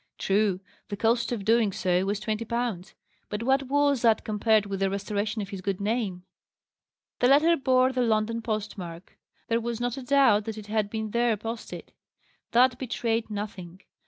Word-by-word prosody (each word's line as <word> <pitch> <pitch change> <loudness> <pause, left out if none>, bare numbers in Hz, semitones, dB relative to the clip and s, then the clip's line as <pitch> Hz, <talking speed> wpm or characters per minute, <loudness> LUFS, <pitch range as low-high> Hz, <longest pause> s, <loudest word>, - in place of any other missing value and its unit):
True, 195 -1 +1 0.3
the 205 - -4
cost 235 +3 +1
of 215 -5 -3
doing 225 -2 +3
so 180 0 0
was 200 +1 -1
twenty 215 +1 -2
pounds: 230 -5 -3 0.3
but 210 +2 -3
what 270 +2 +1
was 285 -1 +2
that 225 -2 +3
compared 215 0 +2
with 195 -1 -4
the 195 0 +1
restoration 205 +2 -2
of 195 - -9
his 195 -2 -6
good 195 0 -2
name? 205 -4 -2 1.0
The 245 - +4
letter 300 +5 +5
bore 260 -3 +3
the 255 -1 -1
London 230 0 +1
post 215 -2 -3
mark. 170 0 -9 0.3
There 230 0 +1
was 235 0 -3
not 245 +1 -2
a - - -5
doubt 250 -6 +4
that 220 -1 -5
it 215 - -8
had 210 -1 -1
been 220 0 -4
there 235 -1 +2
posted. 225 +2 -7 0.6
That 250 +1 +4
betrayed 230 -3 -2
nothing. 200 -4 -6
220 Hz, 180 wpm, -27 LUFS, 205-240 Hz, 1.0 s, letter